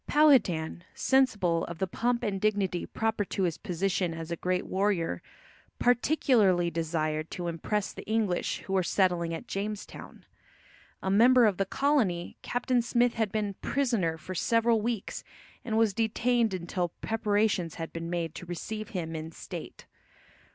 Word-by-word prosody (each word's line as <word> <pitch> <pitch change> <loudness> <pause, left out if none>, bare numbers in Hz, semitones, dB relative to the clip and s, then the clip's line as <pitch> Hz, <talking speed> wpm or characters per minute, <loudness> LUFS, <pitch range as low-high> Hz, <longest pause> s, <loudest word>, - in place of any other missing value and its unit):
Powhatan, 190 - +3
sensible 210 -11 +2
of 170 - -7
the 190 - 0
pomp 235 +6 -1
and 195 -2 -1
dignity 200 -4 0
proper 220 -1 -1
to 195 - -2
his 170 -4 -1
position 180 -2 -1
as 165 0 -6
a - - 0
great 180 +2 -1
warrior, 190 - 0 0.6
particularly 240 - +3
desired 155 -1 -1
to 175 -1 -4
impress 190 +5 -2
the - - -8
English 215 -5 0
who 190 - -5
were 190 - +3
settling 175 -2 +1
at 165 +9 -5
Jamestown. 205 +1 -6 0.8
A 190 - 0
member 240 +4 +6
of 205 -4 +2
the 195 - 0
colony, 230 -13 +1
Captain 245 0 0
Smith 240 0 +2
had 220 -4 -1
been 210 -2 -1
prisoner 230 -12 0
for 160 +4 -7
several 230 +4 +2
weeks 225 -2 -3 0.4
and 220 -2 -1
was 225 -3 +3
detained 230 0 +1
until 175 0 -2
preparations 205 -6 0
had 165 -1 -6
been 165 0 -5
made 170 -2 -2
to 180 - -9
receive 215 +5 -5
him 165 -2 -3
in 160 +1 -5
state. - - -9
195 Hz, 150 wpm, -29 LUFS, 170-225 Hz, 0.8 s, member